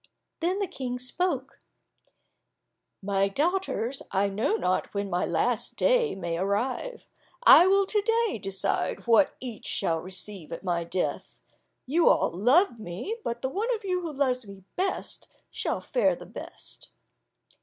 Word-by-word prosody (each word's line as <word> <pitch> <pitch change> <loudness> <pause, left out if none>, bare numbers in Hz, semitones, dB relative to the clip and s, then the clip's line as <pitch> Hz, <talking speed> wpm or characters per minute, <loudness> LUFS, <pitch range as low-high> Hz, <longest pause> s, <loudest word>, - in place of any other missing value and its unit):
Then 355 +3 0
the 400 - 0
King 250 -8 -4
spoke, 270 +1 -2 1.4
"My 195 0 +2
daughters, 290 - -1
I 200 +1 +1
know 220 - 0
not 185 - 0
when 200 -1 -2
my 175 +1 0
last 240 -1 0
day - - +2
may 170 -3 -3
arrive; 250 - -2 0.4
I 360 -7 +9
will 395 +1 +4
to 420 +2 +1
day 455 - +1
decide 195 -1 -2
what 235 +4 +4
each 245 -4 -7
shall 165 -4 0
receive 185 -2 -7
at 165 - -6
my 175 -2 0
death. 180 +2 -3 0.5
You 325 +6 +4
all - - +3
love 245 - +3
me, 210 - -5
but 235 +1 -4
the 260 - 0
one 425 - -1
of 440 - -9
you 365 -1 0
who 335 -2 -4
loves 255 -5 0
me 195 -1 -11
best, 375 +1 -3 0.2
shall - - -2
fare - - +2
the - - -11
best." - - -10
250 Hz, 150 wpm, -27 LUFS, -, 1.4 s, I